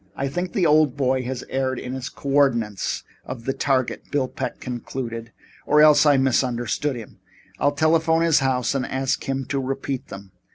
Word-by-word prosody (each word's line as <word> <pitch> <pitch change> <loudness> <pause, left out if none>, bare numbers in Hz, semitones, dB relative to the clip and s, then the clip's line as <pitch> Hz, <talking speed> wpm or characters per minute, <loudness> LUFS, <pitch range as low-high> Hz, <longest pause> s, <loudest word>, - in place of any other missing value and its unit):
"I 135 0 -2
think 175 +5 -3
the 185 - +2
old 150 -3 +4
boy 130 -1 +1
has 130 0 -4
erred 130 -1 -1
in 125 +1 -5
the 130 0 -4
co 140 - -6
ordinates 120 -8 +1 0.2
of 125 -2 -8
the 135 - 0
target," 135 -2 -1
Bill 140 -3 0
Peck - - -5
concluded, 120 -2 -5 0.4
"or 150 - +4
else 150 0 +7
I 145 -2 +6
misunderstood 130 +1 0
him. 115 -3 -10 0.4
I'll 145 - +3
telephone 160 +2 +3
his 165 -2 +4
house 130 -2 0
and 135 -2 -1
ask 130 0 -1
him 135 0 -1
to 140 - 0
repeat 135 0 -3
them." 100 -1 -10
135 Hz, 180 wpm, -23 LUFS, 125-145 Hz, 0.4 s, else